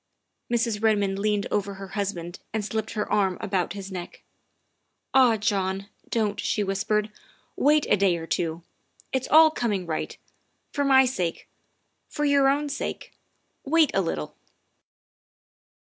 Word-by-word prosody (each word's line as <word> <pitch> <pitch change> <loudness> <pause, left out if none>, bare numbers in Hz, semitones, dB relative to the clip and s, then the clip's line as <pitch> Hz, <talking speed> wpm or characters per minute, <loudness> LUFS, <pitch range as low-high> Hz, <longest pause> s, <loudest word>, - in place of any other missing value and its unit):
Mrs. 230 -3 0
Redmond 205 -3 +2
leaned 210 -1 0
over 200 -1 -1
her 195 0 -9
husband 190 -4 -4 0.2
and 215 -2 -1
slipped 220 +1 -3
her 210 -1 -2
arm 190 -3 +2
about 190 -2 -1
his 195 -1 -7
neck. 180 -2 -8 0.9
"Ah, 250 -4 +5
John, 195 -1 -1 0.2
don't," 210 -3 0
she 210 - 0
whispered, 210 +2 0 0.2
" - - -36
wait 300 +1 +3
a - - +4
day 195 -3 +2
or 165 - -6
two. 165 0 -2 0.5
It's 260 -1 -1
all 315 0 +7
coming 210 - -1
right. 160 -2 -4 0.5
For 285 - -1
my 265 -1 +6
sake, 180 -10 -2 0.6
for 295 - -2
your 280 -1 +4
own 290 +2 +1
sake, 285 - -5 0.5
wait 315 0 +3
a 195 - +2
little." 75 - -4
205 Hz, 145 wpm, -25 LUFS, 190-250 Hz, 0.9 s, all